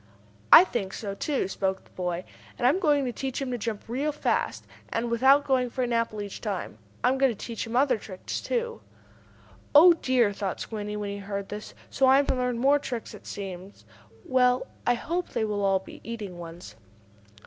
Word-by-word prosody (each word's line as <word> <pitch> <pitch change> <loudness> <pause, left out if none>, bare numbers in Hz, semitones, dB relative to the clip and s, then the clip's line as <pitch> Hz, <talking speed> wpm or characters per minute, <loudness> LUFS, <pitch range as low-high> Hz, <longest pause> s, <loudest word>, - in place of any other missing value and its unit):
"I - - +12
think 210 - -3
so, 200 -3 -4
too," 270 +1 -1
spoke 190 0 -2
the - - -25
boy. 180 -1 -3 0.3
"And 245 - -1
I 250 - +7
am 365 - -1
going 295 -6 +3
to 250 - -1
teach 265 0 -3
him 270 -2 -3
to 245 - -1
jump 220 -1 -3
real 270 +6 -1
fast, 295 - -1 0.2
and 235 +1 -2
without 265 +5 +5
going 255 -3 +2
for 255 +2 -2
an 240 -1 -1
apple 225 -2 -1
each 200 - -8
time. 195 - -4 0.2
I'm 265 +1 +3
going 270 -2 +4
to - - -6
teach 230 +1 -5
him 230 - -5
other 255 -3 +3
tricks, 190 -3 -6
too." 475 -1 -2 0.9
"Oh 345 +4 +10
dear!" 255 -9 +2
thought 195 -2 -3
Squinty, 210 -1 -5
when 205 -1 -3
he 200 - -5
heard 200 0 -5
this. 210 +1 -7 0.2
"So 265 - +3
I 265 +1 +7
am 280 - +3
to - - +1
learn 250 -1 -1
more 275 +4 +4
tricks, 245 -5 -5
it - - -12
seems. 195 -1 -8 0.4
Well, 250 -1 +3 0.2
I 245 - +4
hope 345 +8 -3
they 220 - -1
will 205 -1 -2
all 195 -1 +3
be 190 - -11
eating 210 -6 -6
ones." 165 -10 -9
235 Hz, 205 wpm, -27 LUFS, 200-265 Hz, 0.9 s, I